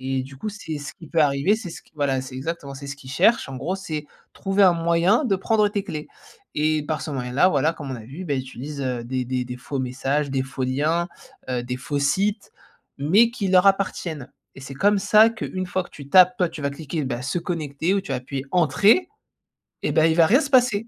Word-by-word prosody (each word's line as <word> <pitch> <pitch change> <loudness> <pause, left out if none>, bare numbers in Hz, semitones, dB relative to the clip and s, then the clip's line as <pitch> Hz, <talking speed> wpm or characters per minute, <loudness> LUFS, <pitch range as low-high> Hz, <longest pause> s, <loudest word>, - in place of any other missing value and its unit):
Et 130 0 -2
du 135 0 -12
coup 215 - -5
c'est 195 -7 -6
ce 145 - -7
qui 165 - -13
peut 165 - +1
arriver 145 +6 +3
c'est 195 -5 -7
ce - - -9
que - - -28
voilà 140 -3 0
c'est 130 0 -9
exactement 140 +1 -5
c'est 140 +1 -9
ce 140 - -6
qu'il 130 -2 -12
cherche 185 - +3
en 130 - -6
gros 170 +9 -2
c'est 155 -6 -5 0.3
trouver 195 +1 0
un 185 - +7
moyen 170 - +2
de 200 -6 +2
prendre 210 +2 +2
tes 205 -1 -3
clés. 155 -5 -6 0.5
Et 155 0 +1
par 155 -4 -2
ce - - -5
moyen 125 -3 -4
là 150 +8 +5
voilà 155 0 +2
comme 140 -4 -7
on - - -4
a - - -9
vu, 145 +11 -8
bah, 150 - -2
il 130 - 0
utilise, 135 +3 -7
heu, 125 -2 -2
des 130 +1 -2
des 125 0 -2
des 125 0 -6
faux 135 +3 -5
messages, 135 +3 -1
des 135 -1 0
faux 130 0 -4
liens, 155 +7 0 0.4
heu, 125 -1 -1
des 125 +1 -4
faux 145 +3 -3
sites 200 +9 0 0.5
mais 200 +12 +4
qui 205 -5 -3
leur 185 +1 +5
appartiennent 175 -8 0 0.2
et - - -10
c'est 135 0 -8
comme 205 +6 +3
ça 215 +3 +5
qu'une 185 -4 -4
fois 185 +1 -2
que - - -16
tu 140 -2 -11
tapes 180 +3 +6
toi 180 -2 +2
tu 150 - -9
vas 140 - 0
cliquer, 150 +1 -4
bah, 125 -1 -3
«se 140 +6 -1
connecter» 165 0 -2
ou 200 - +1
tu 190 - -11
vas - - 0
appuyer 130 +2 -5
«entrer» 200 - +4 0.8
et - - 0
ben, 160 0 +4
il 160 - +3
va 165 - +7
rien 250 - +4
se 280 - -3
passer. 245 -4 +3
155 Hz, 245 wpm, -23 LUFS, 135-190 Hz, 0.8 s, un